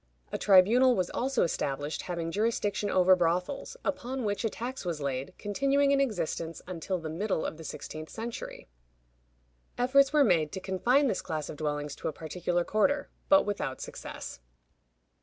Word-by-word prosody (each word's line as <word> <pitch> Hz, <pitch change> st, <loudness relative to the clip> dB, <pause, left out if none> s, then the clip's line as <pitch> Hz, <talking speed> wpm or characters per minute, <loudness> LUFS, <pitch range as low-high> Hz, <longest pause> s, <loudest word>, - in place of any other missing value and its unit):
A -, -, -1 dB
tribunal 225 Hz, +7 st, +6 dB
was 180 Hz, -3 st, -1 dB
also 265 Hz, 0 st, +1 dB
established 145 Hz, -2 st, -2 dB
having 170 Hz, -2 st, -3 dB
jurisdiction 205 Hz, 0 st, 0 dB
over 185 Hz, 0 st, +5 dB
brothels, 180 Hz, -, -1 dB
upon 260 Hz, -1 st, -2 dB
which 205 Hz, 0 st, -1 dB
a 225 Hz, -, +1 dB
tax 250 Hz, +5 st, -5 dB
was 170 Hz, -4 st, -3 dB
laid, 135 Hz, -1 st, -3 dB
continuing 275 Hz, +7 st, +2 dB
in 275 Hz, 0 st, +4 dB
existence 170 Hz, -, -2 dB
until 180 Hz, +1 st, -3 dB
the 165 Hz, -2 st, -6 dB
middle 175 Hz, +2 st, -1 dB
of 155 Hz, -, -4 dB
the 160 Hz, -, -9 dB
sixteenth 155 Hz, +1 st, -7 dB
century. 230 Hz, +1 st, -6 dB, 1.1 s
Efforts 270 Hz, +3 st, +4 dB
were 300 Hz, -1 st, +5 dB
made 160 Hz, -, +3 dB
to -, -, -3 dB
confine 205 Hz, +9 st, +2 dB
this 220 Hz, -8 st, 0 dB
class 155 Hz, -2 st, -4 dB
of 150 Hz, -, -7 dB
dwellings 145 Hz, -1 st, -2 dB
to -, -, -4 dB
a -, -, -2 dB
particular 175 Hz, +3 st, -2 dB
quarter, 280 Hz, +10 st, +1 dB, 0.2 s
but 290 Hz, 0 st, +7 dB
without 200 Hz, -10 st, -3 dB
success. -, -, -7 dB
190 Hz, 160 wpm, -29 LUFS, 160-245 Hz, 1.1 s, but